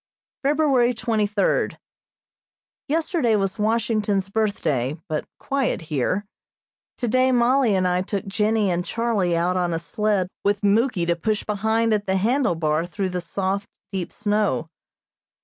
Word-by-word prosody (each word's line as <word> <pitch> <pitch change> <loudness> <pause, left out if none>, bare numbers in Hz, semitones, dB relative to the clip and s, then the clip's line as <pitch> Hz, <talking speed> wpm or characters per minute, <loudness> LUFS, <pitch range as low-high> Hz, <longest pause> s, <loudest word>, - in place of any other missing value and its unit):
February 275 -4 +3
twenty 220 -2 0
third: 205 -1 0 1.1
Yesterday 310 - +1
was 195 0 -1
Washington's 210 -3 0
Birthday, 160 - -1
but 155 -1 -2
quiet 275 -2 -1
here. 180 +9 0 0.7
Today 255 +2 +2
Mollie 245 -2 +3
and 185 -1 +2
I 180 0 +1
took 195 0 -3
Jennie 210 0 +1
and 175 0 0
Charlie 205 -6 0
out 180 +2 +1
on 175 -2 0
a - - 0
sled 205 +2 0 0.2
with 200 0 +1
Muky 205 -2 +2
to 170 0 +1
push 210 +5 -1
behind 220 +2 +1
at 205 -1 -1
the 190 0 +2
handle 235 0 +2
bar 160 +1 0
through 190 +1 -2
the 180 -1 -3
soft, 195 +3 -2 0.2
deep 185 -3 -3
snow. 205 - 0
205 Hz, 140 wpm, -23 LUFS, 180-230 Hz, 1.1 s, February